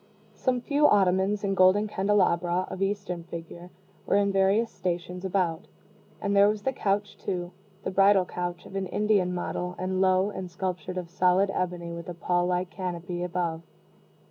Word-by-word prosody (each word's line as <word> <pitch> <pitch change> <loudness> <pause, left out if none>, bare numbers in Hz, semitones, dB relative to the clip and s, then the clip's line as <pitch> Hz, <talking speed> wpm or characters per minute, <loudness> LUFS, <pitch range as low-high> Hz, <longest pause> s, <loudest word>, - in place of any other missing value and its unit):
Some 250 -2 0
few 290 +3 +3
ottomans 195 +1 +2
and 195 -1 0
golden 190 +3 +5
candelabra, 185 -3 +1
of 190 - -6
Eastern 195 -3 -2
figure, 170 +1 -9 0.4
were - - +2
in 200 0 +3
various 195 +4 +2
stations 180 0 -4
about; 185 -2 -1 0.5
and 200 0 -1
there 200 +1 +6
was 210 -1 -2
the 265 - 0
couch, 205 -2 -1
too 175 -2 -3 0.3
the - - -2
bridal 195 0 +5
couch 175 0 -5
of - - -11
an 195 -1 -2
Indian 205 -2 +1
model, 180 0 -3
and 185 +1 -1
low, 190 +1 +3
and 190 -3 -6
sculptured 185 0 -4
of 175 -2 -5
solid 185 +2 +3
ebony, 175 -2 -3
with 170 0 -7
a 175 - -6
pall 175 +1 0
like 180 0 -1
canopy 180 -1 -4
above. 175 -2 -2
185 Hz, 170 wpm, -27 LUFS, 175-200 Hz, 0.5 s, there